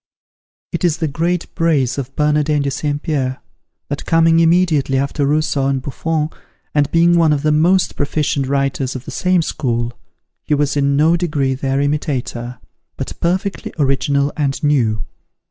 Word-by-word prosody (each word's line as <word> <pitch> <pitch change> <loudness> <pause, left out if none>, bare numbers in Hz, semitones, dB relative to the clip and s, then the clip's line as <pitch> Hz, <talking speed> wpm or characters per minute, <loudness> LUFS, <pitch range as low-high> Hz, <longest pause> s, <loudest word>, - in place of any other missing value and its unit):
It - - -3
is 170 -3 +2
the 160 - -1
great 170 +4 -2
praise 145 -6 +1
of 135 0 -6
Bernardin 150 -1 +1
de 140 - -1
St. 145 +1 -2
Pierre, 130 -5 -1 0.5
that 145 0 -4
coming 165 0 +4
immediately 165 -5 +3
after 140 +1 0
Rousseau 150 -2 +1
and 135 -1 0
Buffon, 155 +4 -2 0.4
and 145 -1 +2
being 170 +2 +4
one 165 -2 +4
of 145 -1 0
the 155 - +3
most 175 +5 +2
proficient 145 -1 -1
writers 135 -1 -1
of 130 0 -7
the - - -7
same 180 -2 +1
school, 120 -5 -2 0.5
he 150 - +1
was 145 0 0
in 140 -1 +2
no 160 +3 +4
degree 150 -6 0
their 135 +1 -1
imitator, 135 -4 -2 0.4
but - - -4
perfectly 185 +3 -1
original 140 0 +1
and 140 -2 -1
new. 115 -9 +1
145 Hz, 160 wpm, -18 LUFS, 135-160 Hz, 0.5 s, coming